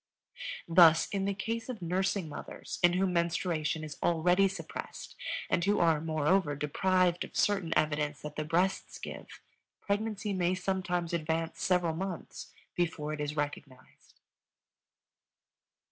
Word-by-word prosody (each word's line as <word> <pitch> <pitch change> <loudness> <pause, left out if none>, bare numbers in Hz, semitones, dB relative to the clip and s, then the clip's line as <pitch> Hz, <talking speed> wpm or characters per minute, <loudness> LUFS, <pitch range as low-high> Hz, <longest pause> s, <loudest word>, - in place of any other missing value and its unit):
Thus, 165 -1 +7
in 195 -1 -1
the 200 - 0
case 225 +4 -3
of 245 -4 -4
nursing 185 +1 0
mothers 150 - -7
in 175 0 +5
whom 185 0 +1
menstruation 170 -2 0
is 150 -1 -7
already 180 +3 +3
suppressed 185 -4 -7 0.3
and 175 - +1
who 205 +3 +2
are, 165 -3 +3
moreover, 155 0 +1
deprived 180 +4 +1
of - - -11
certain 195 -5 +1
evidence 150 -1 0
that 150 0 -6
the 155 - -2
breasts 175 +5 0
give, - - -9 0.4
pregnancy 205 0 -2
may 180 -1 +1
sometimes 180 -2 -1
advance 165 0 -1
several 180 -3 +2
months 185 0 -6 0.2
before 160 -3 -1
it 150 - -4
is 150 0 -3
recognized. 140 -3 -6
175 Hz, 130 wpm, -31 LUFS, 155-190 Hz, 0.4 s, Thus